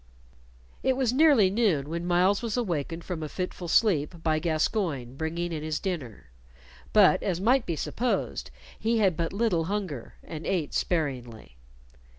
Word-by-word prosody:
It 260 -1 +1
was 255 -3 +1
nearly 270 -9 +5
noon 195 -11 +1
when 170 +2 -4
Myles 180 +3 +3
was 230 -1 -2
awakened 170 - -2
from 175 -2 -5
a 155 - -4
fitful 180 0 -5
sleep 165 -4 +2
by 155 -1 +2
Gascoyne 155 - -1
bringing 170 +3 -3
in 155 - -3
his 155 0 -2
dinner, 145 - -5 0.6
but, 195 -3 +5
as 180 -4 -1
might 240 +5 +3
be 170 - -1
supposed, 240 - -2 0.3
he 230 +1 +1
had 195 -6 +3
but 165 0 -2
little 200 -6 +1
hunger, 185 - -4
and 160 -1 -7
ate 170 -7 -1
sparingly. 125 - -2
175 Hz, 155 wpm, -27 LUFS, 155-210 Hz, 0.6 s, nearly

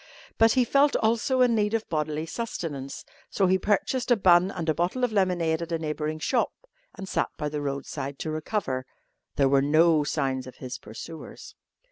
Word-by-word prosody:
But 225 0 +6
he 255 -1 +3
felt 280 +4 +3
also 235 +4 +2
in 245 -2 +5
need 210 0 +1
of 225 - -2
bodily 155 0 -2
sustenance, 160 - -5 0.2
so 195 - +1
he 190 +1 +3
purchased 215 +7 0
a 245 - +6
bun 185 -3 +5
and 175 -4 -5
a 155 - +3
bottle 175 - -1
of 245 - +2
lemonade 175 -5 +1
at 170 0 -5
a 165 - +1
neighbouring 155 0 -3
shop 155 - 0 0.4
and 195 -1 -7
sat - - 0
by 150 - -2
the 150 0 -4
roadside 140 0 -4
to 155 - -4
recover. 155 -5 -2 0.5
There 140 -2 +3
were 135 0 +4
no 155 +2 +4
signs 130 -2 -2
of 130 - -10
his 130 -1 -7
pursuers. 155 +10 -10
165 Hz, 185 wpm, -26 LUFS, 150-210 Hz, 0.5 s, But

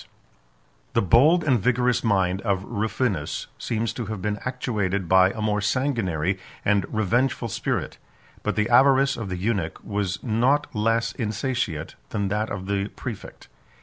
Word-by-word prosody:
] - - -38
The - - +4
bold 150 - +5
and 130 -5 +3
vigorous 125 +3 +1
mind 95 -3 +1
of 100 -4 0
Rufinus 105 - -2
seems 115 0 -2
to 120 -5 -5
have 110 -1 -4
been 105 +2 -2
actuated 105 -7 -2
by 95 +1 +6
a 110 - -6
more 105 -1 +1
sanguinary 100 - 0 0.3
and 100 -1 +2
revengeful 115 +3 +1
spirit; - - -2 0.4
but - - -1
the 105 0 +1
avarice 135 +3 +5
of 115 -4 -5
the 90 - -3
eunuch 95 -4 -1
was 100 -2 -2
not 130 +5 +2
less 115 +2 +1
insatiate 110 - -2 0.2
than 100 -2 -1
that 105 +2 -1
of 95 -2 -5
the 100 0 -1
præfect. 115 -6 -7
105 Hz, 150 wpm, -24 LUFS, 95-120 Hz, 0.4 s, by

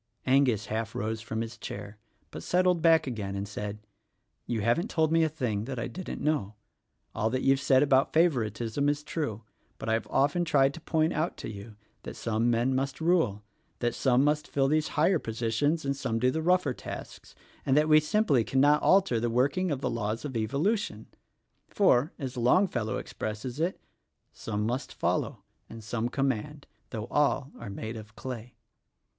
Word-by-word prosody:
Angus 130 -5 +3
half 110 +1 -3
rose 110 +1 -2
from 110 0 -3
his 115 0 -6
chair 105 0 -7 0.3
but - - -7
settled 180 -1 +2
back 165 -1 +5
again 105 -7 -4
and 100 +1 -3
said, 105 0 -5 0.7
"You 115 -3 -1
haven't 120 - +1
told 160 -2 +1
me 165 0 +4
a 160 - +2
thing 120 -7 -3
I 125 -3 -3
didn't 185 -2 -6
know. 110 -10 0 0.6
All 110 - 0
that 130 +2 -2
you've 135 0 +4
said 135 -1 +4
about 135 -1 +3
favoritism 125 - +1
is 145 0 -1
true; 115 -11 -3 0.3
but - - -5
I've 110 0 0
often 145 +6 +2
tried 140 -4 +3
to 165 - -10
point 160 0 +1
out 155 +3 -1
to - - -6
you 105 +1 -10 0.3
that - - -8
some 115 +1 0
men 120 +3 +2
must 135 +1 -2
rule, 160 - +1 0.3
that 120 -1 -1
some 130 0 +3
must 150 +1 +1
fill 135 -1 +1
these 155 +2 +2
higher 165 +3 +4
positions 115 +8 -1
and 140 0 0
some 135 -5 -2
do 125 +2 +2
the 160 - -2
rougher 180 -5 +2
tasks - - -9 0.3
and 135 +1 +2
that 150 +1 +4
we 155 0 +7
simply 155 - +2
cannot 145 +5 +3
alter 190 -12 +4
the 120 +1 0
working 140 +10 +1
of 140 -4 -2
the - - 0
laws 115 +2 -3
of 135 -4 -5
evolution. 140 - -1 0.6
For 150 -7 +3
— - - -41
as 130 -4 -5
Longfellow 120 - +2
expresses 110 +5 -5
it: 170 +4 -1 0.5
'Some 105 -1 -3
must 125 +4 -3
follow - - -1 0.3
and 115 -1 -10
some 115 +2 -2
command, 135 +2 -2 0.2
Though 110 -3 -4
all 145 -1 +1
are - - -7
made 110 +3 -5
of 110 0 -11
clay.' 125 -2 -7
130 Hz, 180 wpm, -28 LUFS, 110-150 Hz, 0.7 s, we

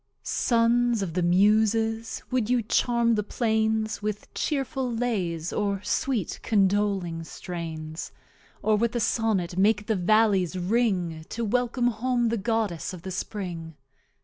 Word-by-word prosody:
Sons 235 -1 +2
of 170 -4 -4
the 180 - 0
Muses, 220 +5 +2
would 245 -4 0
you 245 -2 +2
Charm 235 +1 +2
the 215 - +1
Plains 220 0 0
With 210 0 -4
Chearful 270 -3 -1
Lays, 190 -9 -2
or 200 -2 0
Sweet 245 -7 -1
Condoling 195 -5 +1
Strains; 160 -2 -6 0.5
Or 215 - +3
with 235 +3 0
a - - +1
Sonnet 210 -6 0
make 210 +2 +3
the 220 - +1
Vallies 190 -2 +3
ring, 180 -5 0
To 230 0 -3
Welcome 245 +2 +1
home 240 +1 0
the 230 - 0
Goddess 215 -6 -1
of 180 -2 -9
the 190 - -5
Spring? 175 -5 -5
215 Hz, 135 wpm, -26 LUFS, 185-230 Hz, 0.5 s, Or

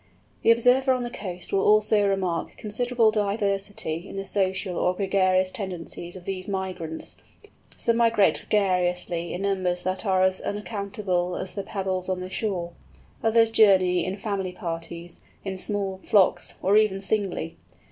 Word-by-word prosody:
The - - +3
observer 250 +3 +5
on 250 -1 -1
the 240 - -5
coast 185 -7 -7
will 195 - +3
also 210 0 +4
remark 185 -4 -1
considerable 230 +1 +1
diversity 200 -4 -2
in - - -8
the 195 0 -4
social 190 -1 -1
or 180 +1 +1
gregarious 185 -1 +2
tendencies 175 -3 -6
of 180 -1 -10
these 185 -1 -4
migrants. 185 -5 -4 0.6
Some 230 -1 +1
migrate 230 -3 +3
gregariously 180 -4 +1
in 180 - -4
numbers 185 -3 0
that 185 +1 -2
are 190 -3 +2
as 185 0 +1
uncountable 200 -4 -2
as 185 - -5
the 200 - -3
pebbles 190 -2 -3
on 185 -1 -1
the 185 +1 -6
shore; 185 -5 -2 0.5
others 225 0 +4
journey 185 -5 +5
in 185 +2 -3
family 195 -3 -3
parties, 170 -1 -6 0.2
in 190 -1 -4
small 195 -1 -3
flocks, 185 -4 +3
or 195 +2 +4
even 210 -3 +3
singly. 195 -5 -2
195 Hz, 150 wpm, -25 LUFS, 180-210 Hz, 0.6 s, observer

